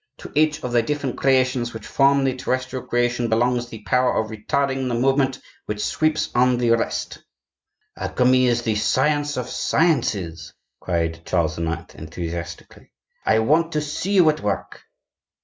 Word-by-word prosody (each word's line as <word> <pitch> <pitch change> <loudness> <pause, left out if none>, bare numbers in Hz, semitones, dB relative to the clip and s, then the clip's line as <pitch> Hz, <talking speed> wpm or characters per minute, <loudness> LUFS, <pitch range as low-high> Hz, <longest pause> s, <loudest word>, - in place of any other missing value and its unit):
To - - -10
each 150 0 +2
of 125 - -3
the 120 -1 +3
different 140 +1 -3
creations 130 -3 +1
which 110 - -8
form 140 0 +3
the 130 -1 0
terrestrial 130 0 -3
creation 120 0 0
belongs 120 +2 +1
the 110 -2 -10
power 125 +4 +2
of 110 0 -1
retarding 130 +5 -1
the 120 - -1
movement 135 0 +1 0.3
which 105 0 -2
sweeps 155 0 0
on 125 0 +3
the 120 -1 +1
rest." 115 - -1 0.8
"Alchemy 130 0 +2
is 120 0 +1
the 110 - 0
science 145 +6 +1
of 125 -1 -3
sciences!" 110 - 0 0.2
cried 85 -2 -2
Charles 80 -3 -1
IX., 85 0 -4
enthusiastically. 85 +1 -7 0.4
"I 110 - +4
want 155 +9 +2
to 150 - 0
see 150 +6 -3
you 180 -5 +5
at 155 - -8
work." 100 -6 -3
125 Hz, 155 wpm, -22 LUFS, 110-135 Hz, 0.8 s, you